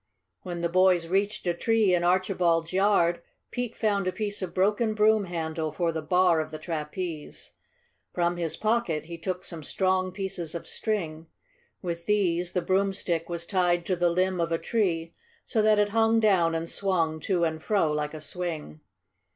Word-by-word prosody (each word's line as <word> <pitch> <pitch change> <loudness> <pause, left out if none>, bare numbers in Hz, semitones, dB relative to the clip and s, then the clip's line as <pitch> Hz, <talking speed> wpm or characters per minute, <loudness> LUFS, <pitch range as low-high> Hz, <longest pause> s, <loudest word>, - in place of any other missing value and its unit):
When 175 -2 -5
the 170 - +1
boys 180 0 +3
reached 195 +5 -1
a 175 - +1
tree 220 +1 +2
in 175 -1 +2
Archibald's 175 -2 +1
yard, 185 -3 +3 0.3
Pete 245 -2 -3
found 200 -3 +1
a - - +1
piece 205 +2 -2
of 185 -2 -3
broken 210 +3 +1
broom 215 -1 +4
handle 160 -2 -3
for 170 +2 0
the 160 -1 -3
bar 180 +1 +3
of 155 0 -2
the 155 - -6
trapeze. 155 0 -5 0.6
From 175 0 0
his 165 -2 -3
pocket 215 -9 0
he 170 0 -8
took 185 +1 -4
some 165 -3 -7
strong 185 +3 0
pieces 180 -4 -4
of 170 - -6
string. 165 -7 -3 0.6
With 170 -1 -4
these 180 -4 +1
the 180 - 0
broomstick 190 -3 0
was 170 -1 -2
tied 175 -2 +1
to 185 - 0
the 175 0 +2
limb 185 +1 +1
of 170 0 -1
a 165 - +2
tree, 165 -6 -1 0.3
so 225 - +1
that 215 0 +4
it 205 0 +3
hung 225 +1 +3
down 185 -7 +3
and 165 +1 -2
swung 165 -5 0
to 175 +2 0
and 160 -1 -1
fro 195 -7 +1
like 150 +1 -2
a 155 - -7
swing. 155 - -5
180 Hz, 180 wpm, -27 LUFS, 165-195 Hz, 0.6 s, broom